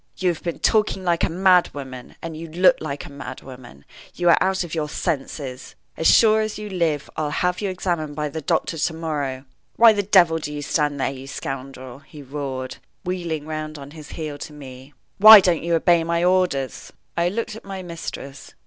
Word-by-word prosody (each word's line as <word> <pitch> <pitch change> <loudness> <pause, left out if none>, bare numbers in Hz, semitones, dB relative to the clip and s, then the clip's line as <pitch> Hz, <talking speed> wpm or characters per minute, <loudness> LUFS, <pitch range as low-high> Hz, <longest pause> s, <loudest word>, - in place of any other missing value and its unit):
"You 185 - +1
have 170 - -3
been 170 -2 -4
talking 210 -3 +1
like 170 -2 +1
a - - +2
mad 180 +1 +4
woman, 130 -3 -9
and 165 -1 -5
you 165 +1 -7
look 180 +4 +4
like 145 -2 -5
a - - -11
mad 130 -2 -8
woman. 125 - -13 0.3
You 175 -1 +2
are - - +6
out 190 0 +1
of 170 - -8
your 155 -2 -2
senses. 135 -5 -4 0.2
As 160 - +1
sure 220 -1 +6
as 215 -1 -3
you 210 -1 -7
live, 165 -6 -1
I'll 155 -1 -2
have 180 +5 -1
you 200 - -1
examined 170 -5 -3
by 150 0 -2
the 160 +2 -6
doctors 155 +2 -1
to 160 - -3
morrow. 145 -5 -3 0.3
Why 230 -1 +7
the 205 - 0
devil 180 -5 +4
do 150 - -5
you 145 0 -5
stand 145 -1 0
there, 135 - 0
you 135 0 -9
scoundrel?" 130 -1 -7
he 145 0 -13
roared, 130 -2 -5 0.3
wheeling 170 -4 -3
round 155 0 -5
on 140 0 -10
his 155 -2 -11
heel 150 -3 -6
to 150 - -8
me. 135 -1 -12 0.2
"Why 215 +1 +12
don't 180 -3 +1
you 170 +1 0
obey 170 0 +3
my 170 +1 0
orders?" 180 -8 0 0.2
I 170 +1 +1
looked 215 +2 -4
at 220 - -11
my 195 -1 -7
mistress. 165 -5 -8
160 Hz, 205 wpm, -22 LUFS, 140-180 Hz, 0.3 s, Why